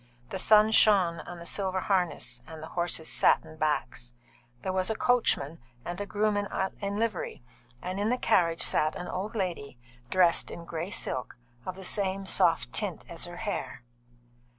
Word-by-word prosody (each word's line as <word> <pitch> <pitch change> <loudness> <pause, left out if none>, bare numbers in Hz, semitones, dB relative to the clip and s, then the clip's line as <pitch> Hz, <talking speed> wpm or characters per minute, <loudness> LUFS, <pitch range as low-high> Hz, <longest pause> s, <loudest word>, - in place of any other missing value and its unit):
The 190 - -3
sun 215 +2 +6
shone 190 -6 +5
on 175 - -7
the 170 - -10
silver 190 +1 0
harness 185 -3 0
and 160 -1 -9
the 160 - -8
horses' 170 -2 -1
satin 160 -1 +2
backs. 135 -5 -2 0.5
There 185 - -2
was 185 +1 +1
a 220 - 0
coachman 215 - +1 0.3
and 175 +3 -4
a 205 - -4
groom 210 +1 +1
in 200 0 -3
livery, 215 - -2 0.4
and 185 +2 -3
in 205 +2 +1
the 250 - +1
carriage 165 -8 +3
sat 155 0 +3
an 180 - -6
old 205 +5 -4
lady 175 - -3 0.3
dressed 180 -2 +3
in 170 - -8
grey 165 +2 -4
silk, 130 -10 -2 0.3
of 185 - -3
the 190 0 -9
same 195 0 0
soft - - +2
tint - - -2
as - - -2
her - - -9
hair. - - -4
185 Hz, 170 wpm, -28 LUFS, 165-205 Hz, 0.5 s, sun